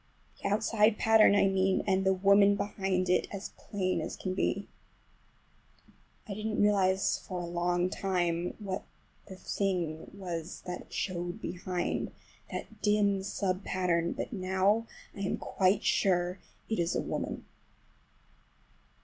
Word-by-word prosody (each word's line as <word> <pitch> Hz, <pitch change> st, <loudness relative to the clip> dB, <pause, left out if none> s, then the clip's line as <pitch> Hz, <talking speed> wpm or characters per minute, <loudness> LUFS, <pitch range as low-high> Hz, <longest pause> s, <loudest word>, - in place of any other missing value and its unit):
The -, -, -1 dB
outside 215 Hz, +1 st, +3 dB
pattern 220 Hz, -2 st, +6 dB
I 200 Hz, -, +5 dB
mean, 190 Hz, 0 st, +2 dB
and 190 Hz, -1 st, +2 dB
the 190 Hz, -, +4 dB
woman 200 Hz, +1 st, +5 dB
behind 190 Hz, -2 st, -1 dB
it 180 Hz, -, +3 dB
is -, -, -19 dB, 0.2 s
as -, -, -32 dB
plain 185 Hz, -3 st, -2 dB
as -, -, -4 dB
can 185 Hz, -, -3 dB
be. 195 Hz, +1 st, -1 dB, 1.6 s
I 205 Hz, -, -4 dB
didn't 215 Hz, +1 st, -3 dB
realize 195 Hz, -2 st, +3 dB
for 185 Hz, -2 st, -6 dB
a 175 Hz, -, -3 dB
long 175 Hz, +1 st, 0 dB
time 175 Hz, -2 st, -1 dB
what 195 Hz, -2 st, -4 dB, 0.4 s
the 190 Hz, -, -8 dB
thing 180 Hz, -5 st, -2 dB
was 170 Hz, -4 st, -5 dB
that 180 Hz, -1 st, -6 dB
showed 175 Hz, -2 st, -3 dB
behind,—that 180 Hz, +4 st, -5 dB
dim 205 Hz, -2 st, +3 dB
sub 190 Hz, -1 st, -2 dB
pattern,—but 175 Hz, +3 st, -1 dB
now 190 Hz, +3 st, +1 dB, 0.3 s
I -, -, -9 dB
am 195 Hz, -1 st, -1 dB
quite 190 Hz, +1 st, +1 dB
sure 180 Hz, -1 st, +2 dB, 0.3 s
it 220 Hz, -, -1 dB
is 170 Hz, 0 st, +1 dB
a -, -, +1 dB
woman. -, -, -4 dB
190 Hz, 130 wpm, -30 LUFS, 180-200 Hz, 1.6 s, pattern